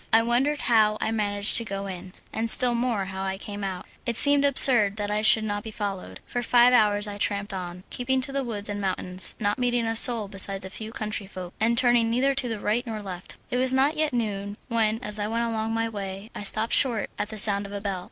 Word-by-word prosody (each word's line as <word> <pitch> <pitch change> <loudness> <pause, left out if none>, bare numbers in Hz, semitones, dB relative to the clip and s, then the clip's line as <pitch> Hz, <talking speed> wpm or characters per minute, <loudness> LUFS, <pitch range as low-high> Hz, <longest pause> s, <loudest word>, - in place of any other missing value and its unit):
I 225 0 +4
wondered 260 +6 0
how 215 -3 +2
I - - -2
managed 205 -2 +1
to 230 - +2
go 195 -2 -5
in, 185 -1 -8 0.2
and 225 +1 0
still 245 +1 +3
more 235 -4 -1
how 190 0 -7
I 190 0 -3
came 205 0 -8
out; 190 -2 -5 0.2
it 235 -2 -2
seemed 285 0 +5
absurd 245 -7 +6
that 205 -1 -4
I 210 0 -1
should 220 0 +5
not 205 -1 -3
be 220 - -9
followed. 195 - -6
For 245 - -4
five 245 +1 +4
hours 210 -3 +3
I 205 0 -7
tramped 200 0 -2
on, 180 -1 -7
keeping 260 +1 -1
to 265 - -3
the 275 0 -2
woods 215 -4 -3
and 205 0 -5
mountains, 185 -1 0
not 205 +2 -1
meeting 245 -1 0
a 225 0 -2
soul 230 -2 +7
besides 195 -1 -2
a 190 - -9
few 220 +2 -8
countryfolk, 195 -5 -7
and 230 +2 +1
turning 240 -2 +3
neither 260 +4 +1
to 270 -2 -3
the 225 -2 -4
right 220 +4 -1
nor 215 -2 -6
left. 180 -2 -8
It 250 - -1
was 260 +1 +4
not 275 +4 +2
yet 310 -1 -1
noon, 205 -4 -4
when, 225 -2 0
as 210 -3 -5
I 205 - -2
went 230 +2 -2
along 225 -1 -3
my 225 0 -1
way, 200 -1 -7
I - - -8
stopped 215 +2 0
short 240 -6 +2
at 205 - -3
the 220 - -7
sound 200 -1 +3
of - - -13
a 205 - -5
bell. 200 -2 -4
215 Hz, 240 wpm, -24 LUFS, 200-240 Hz, 0.2 s, soul